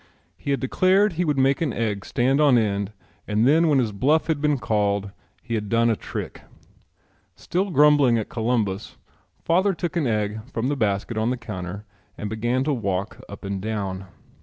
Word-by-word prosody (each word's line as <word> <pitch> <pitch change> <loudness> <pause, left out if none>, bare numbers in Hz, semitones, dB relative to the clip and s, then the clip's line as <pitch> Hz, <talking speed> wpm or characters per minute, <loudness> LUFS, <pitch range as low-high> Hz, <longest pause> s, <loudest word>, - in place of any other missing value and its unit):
He 90 - -7
had 140 - +1
declared 185 +9 +3
he 175 +2 -1
would 150 -3 0
make 135 +2 +2
an 155 -5 +1
egg 105 -4 -2
stand 135 +4 +1
on 140 -5 +5
end 100 -2 0 0.4
and 105 +3 +2
then 160 +4 +4
when 150 -3 +3
his 120 -5 +1
bluff 140 +10 +2
had 155 -3 -1
been 150 -1 +2
called 100 -3 0 0.3
he 120 - -5
had 105 -2 -2
done 115 +1 +3
a - - +1
trick. - - -6 0.9
Still 190 +4 -2
grumbling 145 -6 +5
at 110 - -2
Columbus, 110 -4 -2 0.5
father 185 +3 +2
took 175 +1 -4
an 160 -6 +1
egg 105 -1 -1
from 115 +3 -1
the 145 - 0
basket 110 -1 -1
on 110 +2 +1
the 125 - -1
counter 100 -3 -7 0.3
and 105 0 -5
began 120 +4 0
to 145 +1 0
walk 100 -4 -3
up 100 - -10
and 100 -1 -3
down. 100 -3 -4
115 Hz, 185 wpm, -23 LUFS, 105-145 Hz, 0.9 s, on